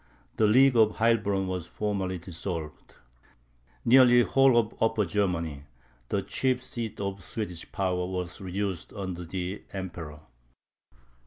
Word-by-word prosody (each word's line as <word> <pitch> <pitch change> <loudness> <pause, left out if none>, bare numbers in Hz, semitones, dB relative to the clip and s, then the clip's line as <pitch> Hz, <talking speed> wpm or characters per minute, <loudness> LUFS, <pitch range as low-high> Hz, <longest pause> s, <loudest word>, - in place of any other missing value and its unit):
The 110 - +4
League 130 +4 +5
of 110 -2 +5
Heilbronn 110 -4 +2
was 90 -2 -4
formally 100 -3 -2
dissolved. 85 -2 -7 0.9
Nearly 120 0 +7
the - - -6
whole 135 -2 +5
of 115 -1 +2
Upper 115 -2 +2
Germany, 85 -6 -1 0.4
the - - 0
chief 130 -1 0
seat 115 -3 -5
of 100 -1 -3
the - - -16
Swedish 90 -5 -6
power, 90 -2 -1
was 90 -1 -5
reduced 95 -1 -3
under 95 -4 -5
the 90 +3 -4
Emperor. 85 -6 -7
95 Hz, 135 wpm, -28 LUFS, 90-110 Hz, 0.9 s, Nearly